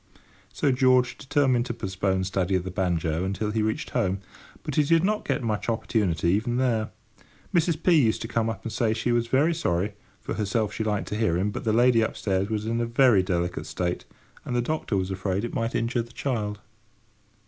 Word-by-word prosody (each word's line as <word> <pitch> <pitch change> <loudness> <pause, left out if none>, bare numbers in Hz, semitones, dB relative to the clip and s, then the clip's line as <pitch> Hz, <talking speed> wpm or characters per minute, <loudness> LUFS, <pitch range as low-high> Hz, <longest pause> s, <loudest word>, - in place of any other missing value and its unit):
So 140 - +1
George 130 -1 +3
determined 135 -4 +1
to 120 - -3
postpone 95 -2 -1
study 95 0 0
of 90 - 0
the 95 - -5
banjo 85 -3 0
until 100 +3 -2
he 110 0 0
reached 110 +1 -2
home. 95 +1 0 0.4
But 150 - -4
he 150 - +4
did 165 +3 +3
not 210 +2 0
get - - 0
much 110 0 -1
opportunity 105 -7 0
even 110 +6 +1
there. 115 -4 +1 0.6
Mrs. 165 -1 +1
P. 180 - +5
used 120 -10 +3
to - - -4
come 115 0 0
up 100 -3 -5
and 115 - -4
say 110 -2 +1
she 120 +2 -1
was 120 0 +1
very 145 +7 +3
sorry—for 100 - -3
herself, 105 0 -1
she 110 - -2
liked 105 -2 -1
to - - -3
hear 110 -7 +1
him—but 100 +5 -2
the 110 - +2
lady 120 +1 +4
upstairs 100 -3 -1
was 105 -1 -2
in 115 +1 0
a 115 - -1
very 115 -4 +5
delicate 90 -1 -2
state, 90 -1 -3 0.4
and 125 - -4
the 120 - +2
doctor 155 -7 -1
was 95 0 -2
afraid 95 +2 -1
it - - -6
might 115 0 -2
injure 120 +1 0
the 120 +1 -10
child. 105 -6 -3
110 Hz, 205 wpm, -26 LUFS, 95-125 Hz, 0.6 s, P